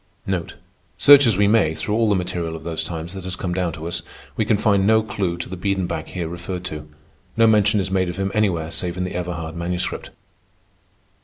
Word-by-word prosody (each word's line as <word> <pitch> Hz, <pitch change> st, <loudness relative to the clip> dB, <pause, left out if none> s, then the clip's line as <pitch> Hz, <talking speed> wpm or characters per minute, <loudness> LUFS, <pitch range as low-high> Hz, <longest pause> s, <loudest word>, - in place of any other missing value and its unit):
Search 140 Hz, -2 st, +8 dB
as 110 Hz, -5 st, +2 dB
we 100 Hz, 0 st, +4 dB
may 100 Hz, -8 st, +3 dB
through 105 Hz, -, -3 dB
all 110 Hz, 0 st, +2 dB
the 100 Hz, -, +3 dB
material 85 Hz, -3 st, -2 dB
of 80 Hz, -, -9 dB
those 80 Hz, -1 st, -3 dB
times 85 Hz, +1 st, -6 dB
that 95 Hz, -1 st, -7 dB
has 90 Hz, 0 st, -3 dB
come 90 Hz, -1 st, -3 dB
down 90 Hz, -2 st, 0 dB
to 80 Hz, 0 st, -6 dB
us, 85 Hz, 0 st, -2 dB, 0.3 s
we 110 Hz, -, 0 dB
can 105 Hz, -1 st, +3 dB
find 100 Hz, -2 st, +2 dB
no 110 Hz, 0 st, +5 dB
clew 100 Hz, -6 st, -2 dB
to 85 Hz, -, -5 dB
the 95 Hz, -, -6 dB
Biedenbach 90 Hz, -4 st, -2 dB
here 90 Hz, -3 st, -4 dB
referred 85 Hz, +2 st, -5 dB
to. 75 Hz, -3 st, -6 dB, 0.5 s
No 115 Hz, -, +6 dB
mention 105 Hz, -1 st, +4 dB
is 95 Hz, -1 st, -2 dB
made 95 Hz, -2 st, +1 dB
of 90 Hz, -, -6 dB
him 95 Hz, 0 st, -1 dB
anywhere 85 Hz, -7 st, 0 dB
save 90 Hz, 0 st, -2 dB
in 90 Hz, -, -1 dB
the 90 Hz, -, -4 dB
Everhard 85 Hz, -2 st, -4 dB
Manuscript. 90 Hz, +1 st, -3 dB
90 Hz, 215 wpm, -22 LUFS, 85-100 Hz, 0.5 s, Search